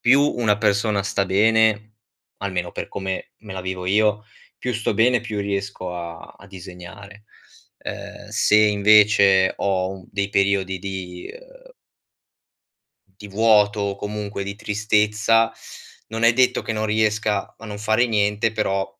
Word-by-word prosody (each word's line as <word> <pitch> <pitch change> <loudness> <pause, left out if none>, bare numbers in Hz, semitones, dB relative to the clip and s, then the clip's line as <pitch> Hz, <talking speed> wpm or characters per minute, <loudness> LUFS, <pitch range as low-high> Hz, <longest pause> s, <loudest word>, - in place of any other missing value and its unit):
più 130 +3 +5
una 115 -7 +1
persona 100 -1 +1
sta 100 0 -1
bene, 110 +2 +3 0.5
almeno 90 -3 -3
per - - -6
come 95 -1 -5
me 105 -3 -10
la 95 - -5
vivo 95 -1 -5
io, 105 +2 +2 0.3
più 125 - -3
sto 115 -1 -1
bene 120 +4 +3
e - - -10
più 105 0 -5
riesco 100 -2 -4
a 85 -1 -8
a 100 - -16
disegnare. 95 +2 -12 0.5
Ehm, - - -8
se 105 - +2
invece 105 -2 +5
ho 95 -1 -1
u 90 - -19
dei 100 0 -2
periodi 100 -1 +1
di, 90 -2 -6
ehm - - -15 1.5
di 105 - -9
vuoto 105 0 +3
o 100 -1 -2
comunque 105 0 -5
di 100 0 -5
tristezza, 110 +2 +1 0.6
non 115 +1 -5
è 115 0 +5
detto 125 0 +3
che - - -4
non 110 - -2
riesca 105 -1 0
a 115 - -13
non 105 -2 -7
fare 110 +3 +2
niente, 105 0 0
però 100 -3 -1
105 Hz, 150 wpm, -22 LUFS, 95-110 Hz, 1.5 s, più